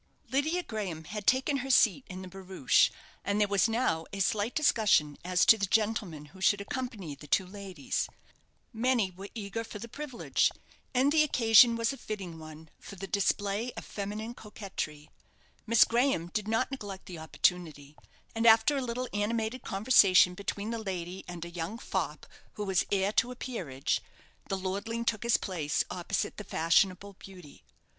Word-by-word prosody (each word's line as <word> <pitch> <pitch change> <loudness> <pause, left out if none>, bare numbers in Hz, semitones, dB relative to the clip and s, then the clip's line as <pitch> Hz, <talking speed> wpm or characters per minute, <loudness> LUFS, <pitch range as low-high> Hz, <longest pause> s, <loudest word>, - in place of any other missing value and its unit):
Lydia 315 +7 +1
Graham 195 - -5
had 205 +5 -7
taken 265 +2 +3
her 270 0 -5
seat 240 -1 +4
in 185 0 -7
the - - -8
barouche, 185 -6 +2 0.3
and 200 +1 0
there 210 - +3
was 200 +2 +2
now 220 -9 0
a 200 - -6
slight 205 +4 0
discussion 210 - +3
as 180 0 +2
to 220 - +7
the 195 - 0
gentlemen 205 -7 0
who 190 - -14
should 205 +1 +3
accompany 205 - -5
the 150 +1 -12
two 190 - +2
ladies. 190 -5 -4 0.6
Many 230 -4 +1
were 195 +3 -10
eager 220 +1 -4
for 220 - -8
the 225 +3 -8
privilege, 265 +1 0 0.4
and 265 +2 +3
the 310 0 +5
occasion 235 -4 +6
was 230 +3 0
a - - -9
fitting 190 -9 -6
one 155 0 -12
for - - -10
the 195 +1 -6
display 205 +3 0
of - - -8
feminine 210 +3 -5
coquetry. 190 -9 -7 0.6
Miss 230 0 +7
Graham 235 -8 +1
did 210 +2 -3
not 225 +4 0
neglect 205 -8 -7
the 175 -3 -8
opportunity; 155 -2 -1 0.4
and 225 +1 +1
after 225 +6 +6
a - - 0
little 250 0 -3
animated 220 +4 -1
conversation 195 -4 +5
between 200 +3 -4
the 230 - -3
lady 185 -3 -5
and 175 -1 -6
a - - -7
young 175 +5 -4
fop - - -3 0.3
who 210 - -5
was 190 -3 +1
heir 195 0 +2
to 230 +3 +2
a - - -7
peerage, 175 - -3 0.5
the 195 - -1
lordling 200 +5 -3
took 220 -3 0
his 235 -1 +3
place 165 -7 -1
opposite 180 +2 -2
the 210 - -6
fashionable 185 +3 +1
beauty. 180 - -13
205 Hz, 170 wpm, -30 LUFS, 180-230 Hz, 0.6 s, to